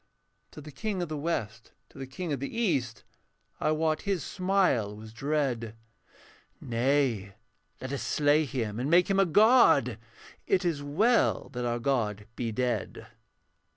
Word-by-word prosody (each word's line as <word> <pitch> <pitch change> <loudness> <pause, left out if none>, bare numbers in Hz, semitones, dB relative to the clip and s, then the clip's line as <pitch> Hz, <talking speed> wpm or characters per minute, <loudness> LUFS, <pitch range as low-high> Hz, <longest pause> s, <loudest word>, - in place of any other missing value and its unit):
Said 150 - -11
the 155 - -10
King 195 +4 -3
of 170 - -6
the 155 - -3
West 115 -8 -4 0.2
to - - -15
the 135 - -6
King 155 +4 -4
of 140 - -3
the 140 - -4
East, 135 - -1 0.6
I - - 0
wot 155 0 0
his 195 -6 -2
smile 180 - 0
was 110 +1 -11
dread, 125 -4 -2 0.8
'Nay, 120 -5 0 0.4
let 130 +1 -6
us 140 - -3
slay 150 +1 +2
him 115 -6 -3
and 130 +4 -2
make 175 +3 +4
him 195 - +2
a 195 - +4
god, 170 - +5 0.5
It 190 -1 +1
is 160 -5 -1
well 205 +12 +1
that 125 -3 -4
our 120 0 -1
god 115 -5 -1
be 115 -2 -3
dead.' 125 +2 -2
140 Hz, 155 wpm, -28 LUFS, 120-170 Hz, 0.8 s, god